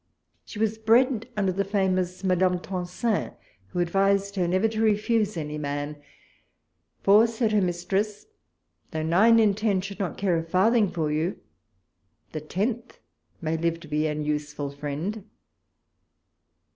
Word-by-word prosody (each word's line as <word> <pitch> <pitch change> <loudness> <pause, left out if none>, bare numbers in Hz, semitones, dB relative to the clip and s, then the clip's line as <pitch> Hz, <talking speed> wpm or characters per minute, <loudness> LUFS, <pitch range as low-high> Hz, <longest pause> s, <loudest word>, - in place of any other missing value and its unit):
She - - -10
was 220 0 0
bred 230 +1 +3
under 195 -2 +2
the 195 +2 0
famous 185 -2 -1
Madame 185 -1 +2
Tencin, 185 +4 -2 0.3
who 100 - -9
advised 195 +3 +1
her 180 -3 +1
never 185 +5 +2
to 220 0 -3
refuse 215 -1 +1
any 150 -1 -4
man; 145 0 -4 1.0
for, 210 +4 +6
said 225 -1 -1
her 210 -1 +3
mis 175 -1 -2
tress, 205 +2 -1 0.6
though 155 0 -3
nine 200 +9 +5
in 215 -3 +4
ten 205 -2 +1
should 195 +1 -7
not 185 -6 -3
care 180 -4 +1
a - - -4
farthing 200 +5 +3
for 155 -4 -2
you, 160 +5 -1 0.9
the 155 - -5
tenth 215 - -3 0.4
may 160 0 -1
live 165 +1 -1
to 160 - -11
be 150 +1 0
an 150 0 -3
useful 150 -1 -3
friend. 150 +9 -4
190 Hz, 145 wpm, -26 LUFS, 165-210 Hz, 1.0 s, for